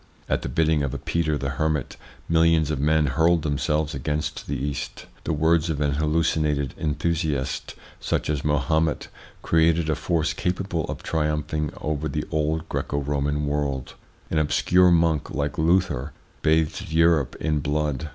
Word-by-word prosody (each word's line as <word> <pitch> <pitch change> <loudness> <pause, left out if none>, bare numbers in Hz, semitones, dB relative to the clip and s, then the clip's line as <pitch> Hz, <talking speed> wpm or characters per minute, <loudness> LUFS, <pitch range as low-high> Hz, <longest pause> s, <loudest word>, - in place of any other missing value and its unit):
At - - 0
the - - -4
bidding 80 +3 +2
of 70 -3 -2
a - - -1
Peter 80 -3 -1
the 70 -1 -3
Hermit 75 -4 0 0.3
millions 80 -2 +3
of 75 - -2
men 75 +2 +3
hurled 80 +4 +2
themselves 75 +1 0
against 75 +1 -3
the 70 - -2
East; 70 +1 -4 0.2
the - - 0
words 80 +2 +2
of 75 -3 -1
an 75 -1 +1
hallucinated 75 -2 +1
enthusiast 75 -3 -1 0.2
such - - -1
as 75 -3 -1
Mahomet 75 +2 +1 0.3
created 80 -1 +3
a - - +1
force 80 0 0
capable 90 -2 -2
of - - -6
triumph 75 -1 -1
ing 75 -1 0
over 75 0 -2
the - - -2
old 80 +1 0
Greco 70 - -2
Roman 75 +1 -1
world; 70 -3 -2 0.4
an 80 - +2
obscure 90 +4 +4
monk 85 -3 +2
like 75 +1 -2
Luther 80 -5 +1 0.3
bathed 80 0 +1
Europe 80 -4 +3
in 75 -2 -1
blood. 75 0 -1
75 Hz, 155 wpm, -24 LUFS, 75-80 Hz, 0.4 s, obscure